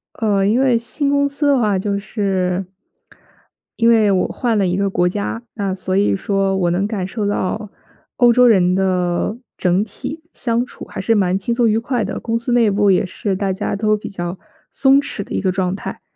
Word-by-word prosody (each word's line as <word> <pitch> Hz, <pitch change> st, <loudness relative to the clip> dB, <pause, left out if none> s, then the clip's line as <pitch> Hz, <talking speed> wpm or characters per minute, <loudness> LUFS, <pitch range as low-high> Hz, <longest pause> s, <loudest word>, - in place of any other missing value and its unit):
呃， 205 Hz, -3 st, +1 dB
因 215 Hz, +5 st, +2 dB
为 260 Hz, -3 st, +3 dB
新 280 Hz, +5 st, -2 dB
公 285 Hz, 0 st, +2 dB
司 285 Hz, +1 st, -1 dB
的 280 Hz, -1 st, +4 dB
话 210 Hz, -5 st, +1 dB
就 200 Hz, +1 st, -1 dB
是 190 Hz, -3 st, -1 dB, 1.1 s
因 230 Hz, 0 st, +4 dB
为 220 Hz, -3 st, +4 dB
我 185 Hz, -2 st, +2 dB
换 235 Hz, -3 st, -1 dB
了 200 Hz, -, +2 dB
一 180 Hz, +1 st, 0 dB
个 200 Hz, 0 st, +1 dB
国 180 Hz, -2 st, +1 dB
家， 205 Hz, +4 st, -3 dB
那 200 Hz, -4 st, -2 dB
所 185 Hz, 0 st, -3 dB
以 200 Hz, +1 st, +2 dB
说 195 Hz, 0 st, 0 dB
我 175 Hz, -2 st, +1 dB
能 185 Hz, +3 st, 0 dB
感 200 Hz, -4 st, -3 dB
受 210 Hz, +2 st, -3 dB
到 205 Hz, +1 st, -2 dB, 0.5 s
欧 245 Hz, -2 st, +6 dB
洲 250 Hz, +1 st, +5 dB
人 185 Hz, -5 st, +4 dB
的 185 Hz, +2 st, 0 dB, 0.2 s
整 185 Hz, +2 st, +2 dB
体 285 Hz, +9 st, -7 dB
相 235 Hz, 0 st, -1 dB
处 -, -, -11 dB
还 -, -, -8 dB
是 225 Hz, -, +2 dB
蛮 190 Hz, -2 st, +2 dB
轻 200 Hz, +5 st, -2 dB
松 235 Hz, -1 st, +2 dB
愉 215 Hz, -, +2 dB
快 240 Hz, 0 st, -1 dB
的， 190 Hz, -, -4 dB
公 230 Hz, 0 st, -1 dB
司 235 Hz, +2 st, -4 dB
内 235 Hz, -3 st, +4 dB
部 205 Hz, 0 st, +3 dB
也 185 Hz, -, +2 dB
是 195 Hz, +2 st, -3 dB
大 195 Hz, 0 st, -1 dB
家 190 Hz, -, -3 dB
都 215 Hz, +1 st, +1 dB
比 210 Hz, -, -7 dB
较 175 Hz, -1 st, -5 dB, 0.3 s
松 270 Hz, 0 st, +5 dB
弛 245 Hz, -7 st, -5 dB
的 -, -, -18 dB
一 -, -, -1 dB
个 190 Hz, -, +1 dB
状 185 Hz, 0 st, -1 dB
态。 -, -, -7 dB
205 Hz, 230 characters per minute, -19 LUFS, 190-230 Hz, 1.1 s, 欧